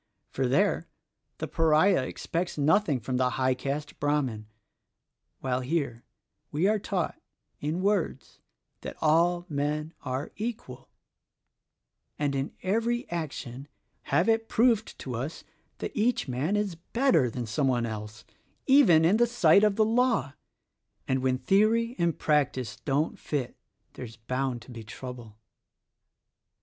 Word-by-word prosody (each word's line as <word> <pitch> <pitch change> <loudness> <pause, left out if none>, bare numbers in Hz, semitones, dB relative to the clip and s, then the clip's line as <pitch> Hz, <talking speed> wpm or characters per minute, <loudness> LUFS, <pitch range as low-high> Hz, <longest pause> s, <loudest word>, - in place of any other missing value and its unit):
For, 130 -1 0
there, 130 - +2 0.5
the - - -4
Pariah 165 +2 +3
expects 175 0 -3
nothing 150 -1 +3
from 125 +3 -2
the 125 0 +2
high 130 0 +2
caste 140 +3 -4
Brahmin; 135 -8 -1 0.9
while 130 -1 0
here, 130 -4 -2 0.5
we 160 +6 +2
are 215 0 +2
taught 190 -3 -3 0.2
— - - -49
in 175 +4 -2
words 200 -3 -1 0.2
— - - -52
that - - -7
all 170 +3 +3
men 150 +1 -2
are 130 +1 -4
equal; 210 - -6 1.3
and 145 -1 0
in 135 +1 -2
every 230 +5 0
action 140 -5 -5 0.4
have 175 - +2
it 225 0 +2
proved 230 -2 +2
to 130 - -6
us 130 +7 -5 0.3
that - - -5
each 225 -2 +1
man 135 +10 -1
is 205 -3 0
better 170 - +1
than 120 +1 -4
some 135 +6 0
one 120 -2 +1
else, 110 -1 -7 0.4
even 220 - +6
in 190 +6 +4
the 240 +1 +4
sight 200 -5 +5
of 210 -2 +3
the 215 - +3
law: 230 - +1 0.4
— - - -49
and 130 0 +1
when 130 0 +1
theory 225 - +2
and 170 -2 +1
practice 140 -5 0
don't 145 +3 0
fit 140 -5 -3 0.4
there's 115 -2 -9
bound 125 +1 -3
to 125 - -13
be 115 -2 -8
trouble." 115 -1 -9
150 Hz, 140 wpm, -28 LUFS, 130-200 Hz, 1.3 s, even